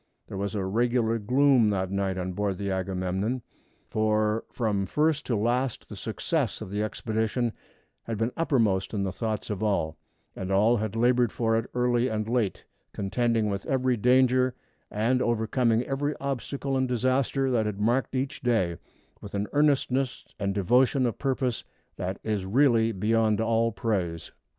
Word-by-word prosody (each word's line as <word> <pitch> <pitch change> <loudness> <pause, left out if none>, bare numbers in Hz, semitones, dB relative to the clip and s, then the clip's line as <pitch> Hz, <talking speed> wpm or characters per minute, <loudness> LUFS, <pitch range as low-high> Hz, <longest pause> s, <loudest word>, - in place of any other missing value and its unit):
There - - -8
was 100 +2 -3
a 100 -2 -1
regular 115 +2 +1
gloom 125 +1 +4
that 95 -2 -1
night 100 -1 -1
on 90 0 -3
board 100 0 -1
the 100 0 -3
Agamemnon, 95 +5 -2 0.4
for 110 0 +1
from 105 -5 -1
first 150 +3 +1
to 120 - +1
last 120 +4 -1
the - - -7
success - - -2
of 95 - -7
the 105 +1 -1
expedition 110 +2 -1 0.5
had 115 -2 -3
been 115 +3 0
uppermost 110 - +1
in 100 - 0
the 95 - -1
thoughts 110 +1 -3
of 100 -1 -4
all, 100 -8 0 0.4
and 95 0 -4
all 110 +5 +4
had 110 0 -3
labored 120 0 +3
for 115 -1 0
it 115 +1 -1
early 125 0 +2
and 110 -2 -2
late, 115 -5 -1 0.3
contending 115 +2 0
with 100 -1 -2
every 130 -2 +1
danger 130 +2 +3 0.3
and 120 +5 +1
overcoming 115 0 +1
every 145 +3 -2
obstacle 140 0 -3
and 130 -1 +1
disaster 130 +2 +1
that 110 -3 +1
had 105 -1 -4
marked 120 +5 +1
each 135 +1 -2
day, 105 -9 +1 0.4
with 100 - -8
an 100 +1 0
earnestness 135 -3 +1
and 100 -1 -1
devotion 125 +6 +3
of 120 - -2
purpose 130 -3 -1 0.3
that 95 +2 -3
is 105 -3 -1
really 115 +2 +3
beyond 110 +1 +1
all 115 +1 +2
praise. 95 -7 -2
115 Hz, 160 wpm, -27 LUFS, 100-125 Hz, 0.5 s, gloom